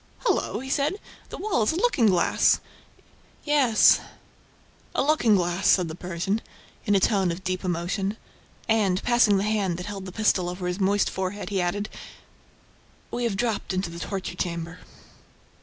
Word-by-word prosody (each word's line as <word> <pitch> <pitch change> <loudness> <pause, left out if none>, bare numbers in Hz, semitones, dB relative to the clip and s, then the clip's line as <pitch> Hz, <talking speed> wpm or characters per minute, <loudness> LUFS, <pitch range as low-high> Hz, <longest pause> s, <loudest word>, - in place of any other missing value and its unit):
"Hullo!" - - 0
he 265 - -7
said. 295 +5 +1 0.3
"The - - -7
wall 385 - 0
is 215 - +2
a - - -4
looking 360 - +2
glass!" 180 -4 +3 0.8
"Yes, 280 -7 +5 1.0
a - - +2
looking 275 -7 +3
glass!" 175 0 0
said 180 -3 +4
the - - -5
Persian, 180 +5 -3 0.5
in 205 - +3
a - - +5
tone 190 -2 +2
of 175 +3 -6
deep 185 0 -2
emotion. 185 +4 -2 0.5
And, 205 -5 +2
passing 240 -4 +4
the 195 - 0
hand 205 -5 0
that 180 - -6
held 195 -2 -6
the - - -7
pistol 190 -3 +1
over 180 +1 -5
his 180 +2 -2
moist 200 +1 +2
forehead, 190 +2 -4
he 195 -2 0
added, 205 +4 -1 1.2
"We 240 0 -2
have 210 -4 -1
dropped 220 -3 -1
into 185 -2 -2
the 170 - -8
torture 190 -1 -4
chamber!" 170 0 -4
195 Hz, 165 wpm, -25 LUFS, 180-220 Hz, 1.2 s, Yes